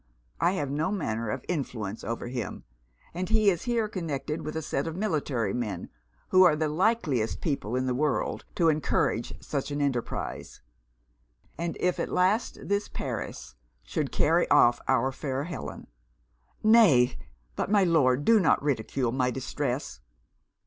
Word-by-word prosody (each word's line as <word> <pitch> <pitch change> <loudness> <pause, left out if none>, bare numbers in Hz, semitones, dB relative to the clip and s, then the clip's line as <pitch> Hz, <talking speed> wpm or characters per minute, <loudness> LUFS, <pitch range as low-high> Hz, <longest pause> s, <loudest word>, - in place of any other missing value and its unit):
I 175 - +3
have 145 -7 -2
no 155 +6 0
manner 115 - -2
of - - -4
influence 115 - -3
over 115 +1 -4
him; 120 -4 -5 0.5
and 180 +2 -3
he 215 -2 +4
is 175 - -4
here 235 -3 +1
connected 155 -5 -4
with 155 - -5
a 160 - -1
set 140 +1 -2
of 165 - -4
military 145 - -1
men, 105 -7 -3 0.4
who 185 - +6
are 175 -5 +7
the 155 0 0
likeliest 155 - +1
people 135 - -2
in 130 0 0
the 130 - 0
world 135 -4 -1
to 165 -2 +4
encourage 150 -6 0
such 140 -1 -2
an 145 0 -3
enterprize 125 - -3 1.0
and 170 0 -3
if 180 0 0
at - - -1
last 190 +6 +1
this 200 +1 0
Paris - - -5 0.3
should - - -2
carry - - +2
off 120 0 +5
our 130 0 +2
fair 135 0 -3
Helen!' 170 +2 -6 0.8
'Nay, 195 - +6 0.4
but - - -2
my 205 -1 +4
Lord 145 -6 +3
do 230 -1 +6
not 180 - +3
ridicule 130 -2 0
my 125 0 +1
distress.' 130 +1 -3
145 Hz, 155 wpm, -28 LUFS, 125-180 Hz, 1.0 s, are